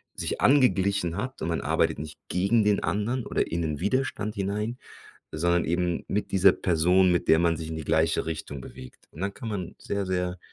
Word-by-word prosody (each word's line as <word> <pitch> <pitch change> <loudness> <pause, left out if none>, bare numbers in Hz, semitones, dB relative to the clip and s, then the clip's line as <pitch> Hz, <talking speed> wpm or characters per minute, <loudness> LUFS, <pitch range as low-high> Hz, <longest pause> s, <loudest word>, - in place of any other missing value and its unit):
sich - - -3
angeglichen 100 - +3
hat 130 +6 -5
und - - -2
man 85 - -1
arbeitet - - +1
nicht 75 0 -8
gegen 100 +5 +2
den 105 -1 +2
anderen 105 +8 -1
oder - - 0
in 85 +1 -1
'nen 75 -3 -2
Widerstand 105 0 -1
hinein, 105 +4 -2 0.6
sondern 85 +2 +2
eben 85 0 -1
mit 105 - -2
dieser 95 0 +6
Person, 90 +2 +3
mit 85 - 0
der 80 - +6
man 85 -1 +2
sich 80 -1 -6
in 80 - -5
die 80 - -5
gleiche 80 +1 +1
Richtung 75 -3 -5
bewegt. 65 -1 -12
Und 75 - -12
dann 100 +1 -2
kann 115 +3 -7
man 95 -5 -4
sehr, 100 -1 -3
sehr 90 -1 -2
90 Hz, 200 wpm, -26 LUFS, 80-105 Hz, 0.6 s, dieser